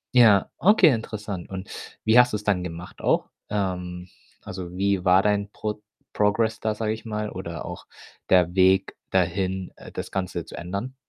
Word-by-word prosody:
Ja, 110 Hz, -5 st, +6 dB
okay, 195 Hz, -2 st, +6 dB
interessant. 105 Hz, -5 st, -5 dB
Und 95 Hz, 0 st, -6 dB, 0.4 s
wie 110 Hz, +3 st, +6 dB
hast 125 Hz, -2 st, +5 dB
du's 105 Hz, 0 st, -2 dB
dann 100 Hz, -4 st, +1 dB
gemacht 85 Hz, +1 st, -8 dB
auch? -, -, +1 dB, 0.2 s
Ähm, 90 Hz, -3 st, -3 dB, 0.4 s
also, 90 Hz, -1 st, -7 dB
wie 100 Hz, -1 st, +1 dB
war 95 Hz, +1 st, +5 dB
dein 105 Hz, -1 st, +1 dB
Pro 105 Hz, 0 st, -4 dB, 0.3 s
Progress 110 Hz, +1 st, +1 dB
da, 110 Hz, -1 st, -1 dB
sage 110 Hz, 0 st, -1 dB
ich 110 Hz, -, -8 dB
mal, 105 Hz, -1 st, -3 dB
oder 85 Hz, -3 st, -6 dB
auch -, -, -8 dB, 0.4 s
der 90 Hz, -2 st, +4 dB
Weg 95 Hz, 0 st, +3 dB
dahin, 95 Hz, +1 st, 0 dB
äh, -, -, -12 dB
das -, -, -6 dB
Ganze 90 Hz, -3 st, -3 dB
zu -, -, -10 dB
ändern? 100 Hz, +9 st, -5 dB
100 Hz, 170 wpm, -25 LUFS, 90-105 Hz, 0.4 s, Ja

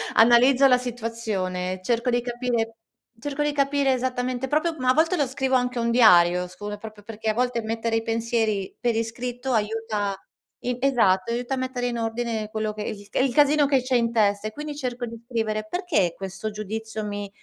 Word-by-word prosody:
analizzo 250 Hz, +4 st, +6 dB
la 250 Hz, -1 st, +5 dB
situazione. 215 Hz, -7 st, -3 dB
Cerco 235 Hz, +4 st, 0 dB
di 240 Hz, 0 st, +2 dB
capire 240 Hz, -2 st, -2 dB, 0.4 s
cerco 290 Hz, +4 st, -3 dB
di 295 Hz, -, +1 dB
capire 280 Hz, -1 st, +2 dB
esattamente 255 Hz, 0 st, -2 dB
proprio 310 Hz, +4 st, +1 dB
ma 255 Hz, 0 st, +1 dB
a -, -, +6 dB
volte 325 Hz, +5 st, +3 dB
lo 290 Hz, -, +2 dB
scrivo 265 Hz, 0 st, -1 dB
anche 250 Hz, -1 st, 0 dB
un 235 Hz, 0 st, 0 dB
diario, 180 Hz, -6 st, +5 dB
scu 205 Hz, +3 st, -8 dB
è 210 Hz, -, -5 dB
proprio 215 Hz, -1 st, -11 dB
perché 220 Hz, 0 st, -4 dB
a -, -, +2 dB
volte 245 Hz, 0 st, 0 dB
mettere 225 Hz, +1 st, -2 dB
i 225 Hz, -, 0 dB
pensieri 225 Hz, -3 st, -1 dB
per 240 Hz, -2 st, 0 dB
iscritto 245 Hz, +3 st, -3 dB
aiuta 215 Hz, -2 st, -1 dB, 0.5 s
in 250 Hz, 0 st, -1 dB
esatto, 230 Hz, -7 st, +2 dB
aiuta 245 Hz, +2 st, -2 dB
a -, -, -6 dB
mettere 255 Hz, -1 st, -2 dB
in 240 Hz, -1 st, -2 dB
ordine 225 Hz, -1 st, -2 dB
quello 215 Hz, 0 st, -2 dB
che 210 Hz, 0 st, -5 dB
esiste 205 Hz, -1 st, -4 dB
e -, -, +4 dB
il 255 Hz, -, -1 dB
casino 295 Hz, +1 st, +5 dB
che 270 Hz, -2 st, +3 dB
c'è 255 Hz, +1 st, -1 dB
in 230 Hz, -1 st, +2 dB
testa, 205 Hz, -2 st, +2 dB
e 215 Hz, -, -5 dB
quindi 295 Hz, +1 st, -6 dB
cerco 250 Hz, -3 st, -3 dB
di 230 Hz, -1 st, -8 dB
scrivere. 220 Hz, 0 st, -2 dB
Perché 335 Hz, -, 0 dB
questo 195 Hz, +3 st, -5 dB
giudizio 220 Hz, +1 st, -5 dB
mi 205 Hz, -1 st, -4 dB
235 Hz, 195 wpm, -24 LUFS, 215-255 Hz, 0.5 s, analizzo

